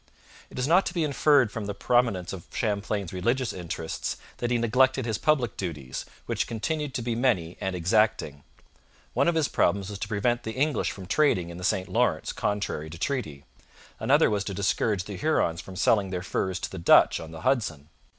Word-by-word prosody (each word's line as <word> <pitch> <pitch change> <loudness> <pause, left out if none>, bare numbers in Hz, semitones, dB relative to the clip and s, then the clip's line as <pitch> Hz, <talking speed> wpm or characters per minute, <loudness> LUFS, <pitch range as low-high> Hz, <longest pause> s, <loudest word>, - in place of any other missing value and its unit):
It - - -12
is 125 - 0
not 175 +5 +4
to 175 - -5
be 170 - +1
inferred 140 -4 +3
from 105 -2 -5
the 100 - -4
prominence 110 -6 +1
of 90 -3 -8
Champlain's 100 -3 -2
religious 115 +6 0
interests 85 -2 -4 0.2
that 120 - -2
he 120 - +2
neglected 125 +2 +2
his 110 -3 -2
public 125 -7 +1
duties, 75 -9 -5 0.2
which - - -1
continued 145 +5 -3
to 120 - -2
be 120 0 -1
many 110 -9 +1
and 95 -1 -2
exacting. 90 -6 +1 0.7
One 140 +5 +2
of 170 - +2
his 160 -3 +2
problems 100 0 +1
was 100 - -7
to - - -3
prevent 120 +3 0
the 110 -1 -5
English 140 0 0
from 95 - -8
trading 90 - +2
in 85 - -8
the - - -8
St 95 0 0
Lawrence 95 - 0
contrary 100 -7 -2
to 85 - -9
treaty; 85 - -3 0.5
another - - +4
was 100 -1 0
to 100 - -4
discourage 100 0 0
the 100 0 -7
Hurons 90 - +1
from 95 +3 -11
selling 100 +1 +2
their 90 -1 -3
furs 95 0 -1
to - - -4
the 95 - -6
Dutch 85 - +5
on 80 - -8
the 80 -1 -9
Hudson. 85 - 0
105 Hz, 200 wpm, -27 LUFS, 90-125 Hz, 0.7 s, Dutch